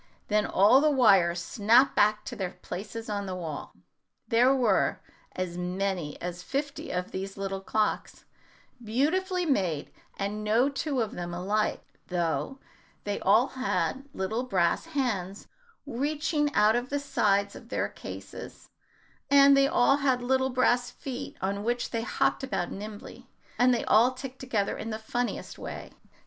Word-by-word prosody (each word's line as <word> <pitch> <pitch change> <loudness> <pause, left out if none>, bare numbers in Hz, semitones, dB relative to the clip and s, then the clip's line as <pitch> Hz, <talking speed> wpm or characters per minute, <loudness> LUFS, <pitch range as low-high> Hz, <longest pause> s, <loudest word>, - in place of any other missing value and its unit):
Then 210 0 +2
all 215 +8 +5
the 305 - +4
wires 195 -11 +4
snapped 225 +9 +3
back 210 0 +3
to 245 - -6
their 190 -5 -4
places 215 +5 -6
on 205 -2 -3
the 185 - -4
wall. 165 -5 -6 0.5
There 245 +2 +4
were 245 -7 +2 0.4
as 180 -1 -3
many 180 -3 -2
as 180 0 -5
fifty 275 +7 -4
of 180 0 -3
these 195 +1 -5
little 195 -1 -3
clocks, 215 +2 -2 0.6
beautifully 355 - 0
made, 185 - 0 0.3
and 205 +2 -3
no 225 +6 +3
two 275 -1 -2
of 220 - -2
them 175 0 -5
alike, 205 +4 -1 0.2
though 175 +9 -1 0.5
they 205 0 -2
all 220 +7 +4
had 260 - -2
little 215 +4 -2
brass 195 - 0
hands 215 - -2 0.4
reaching 295 +3 -1
out 215 +2 +5
of 245 +1 -2
the 285 - 0
sides 200 -7 +1
of - - -12
their - - -1
cases, - - -10 0.6
and 280 0 +7
they 275 0 +5
all 275 +1 +4
had 260 -3 +1
little 260 +1 +2
brass 245 -1 +2
feet, 270 0 -7
on 200 +1 -2
which 240 +2 -1
they 230 - -1
hopped 235 - 0
about 195 -8 -2
nimbly, 210 +1 -9 0.3
and 250 +1 +5
they 240 - 0
all 235 +4 +5
ticked 260 0 -8
together 220 -6 -1
in 225 - -5
the 215 - -3
funniest 240 +2 -4
way. - - -7
220 Hz, 155 wpm, -28 LUFS, 195-260 Hz, 0.6 s, and